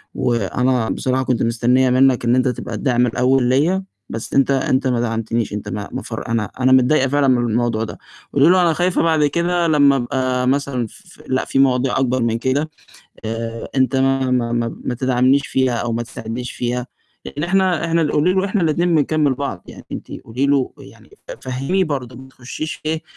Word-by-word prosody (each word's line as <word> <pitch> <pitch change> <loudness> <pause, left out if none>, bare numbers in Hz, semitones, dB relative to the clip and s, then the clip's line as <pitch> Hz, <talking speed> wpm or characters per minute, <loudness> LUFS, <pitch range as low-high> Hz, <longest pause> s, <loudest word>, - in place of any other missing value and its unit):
وأنا 120 +1 0
بصراحة 130 0 -1
كنت 125 -3 0
مستنِّية 125 +3 +2
منك 130 -1 +3
إن 120 +1 +3
أنت 130 0 +2
تبقى 125 - -4
الداعم 125 -3 +1
الأول 125 +2 +2
ليَّا، 150 +10 +2 0.3
بس 115 - -6
أنت 135 0 +3
أنت 130 0 +1
ما 125 -2 +1
دعمتنيش، 115 -1 -2
أنت 105 - -5
ما 105 -1 -5
ما - - -4
فر - - -6
أنا 115 -2 0
أنا 130 0 +3
متضايِّقة 130 +1 +4
فعلًا 145 0 +2
من 120 -3 +2
الموضوع 115 -1 0
ده. 115 - -7 0.4
وقولي 145 +4 +5
له 185 0 +5
أنا 170 -2 +3
خايفة 180 +2 +1
بعد 160 -2 +3
كده 170 +3 0
لمَّا 145 -3 +4
أبقى 125 0 -1
مثلًا 135 -3 0
ف 180 - -18
لأ، 130 0 0
في 135 - -1
مواضيع 130 0 +2
أكبر 130 -2 +1
من 115 0 0
كده، 135 +5 -1 0.6
آآ، 115 +1 -4
أنت 130 0 +2
ما 135 0 +1
ما 120 -2 0
ما 115 -1 -2
ما 125 - -2
تدعمنيش 130 +2 +2
فيها، 130 -2 +1
أو 120 0 -2
ما 115 - -1
تساعدنيش 115 +1 -6
فيها، 125 0 -3 0.4
يعني 145 +2 -4
إحنا،-إحنا 170 -4 +1
قولي 165 +5 +2
له 190 0 +1
إحنا 195 -2 -1
الاتنين 170 +2 +1
بنكمِّل 150 -2 +2
بعض. 125 -10 -5
يعني - - -11
أنتِ - - -7
قولي 125 +5 -1
له 140 -2 +1
يعني، - - -16 0.3
فهِّميه 135 +9 -1
برضه، 130 -5 -4
ما 130 +1 -12
تخشيش 130 +5 -7
إيه، 160 +1 -1
130 Hz, 190 wpm, -19 LUFS, 120-145 Hz, 0.6 s, وقولي